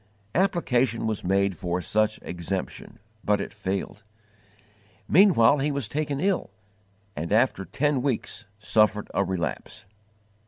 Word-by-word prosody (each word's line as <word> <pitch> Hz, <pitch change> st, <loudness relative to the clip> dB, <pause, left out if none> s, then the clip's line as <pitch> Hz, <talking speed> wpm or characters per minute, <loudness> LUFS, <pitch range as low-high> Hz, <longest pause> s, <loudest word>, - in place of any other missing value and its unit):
Application 130 Hz, -, +1 dB
was 110 Hz, -2 st, -2 dB
made 95 Hz, +1 st, +1 dB
for 90 Hz, +1 st, -2 dB
such 110 Hz, +4 st, +1 dB
exemption, 90 Hz, +2 st, -5 dB, 0.3 s
but 105 Hz, 0 st, +2 dB
it -, -, -5 dB
failed. 100 Hz, 0 st, -4 dB, 1.1 s
Meanwhile 150 Hz, -, +5 dB
he 145 Hz, +2 st, 0 dB
was 140 Hz, -5 st, -2 dB
taken 145 Hz, +2 st, -2 dB
ill, 190 Hz, +1 st, 0 dB, 0.7 s
and 80 Hz, +4 st, -4 dB
after 110 Hz, -3 st, +2 dB
ten 145 Hz, +2 st, 0 dB
weeks 125 Hz, -3 st, -2 dB
suffered 105 Hz, -1 st, +1 dB
a 100 Hz, -, +2 dB
relapse. 90 Hz, -7 st, -4 dB
110 Hz, 120 wpm, -26 LUFS, 95-140 Hz, 1.1 s, Meanwhile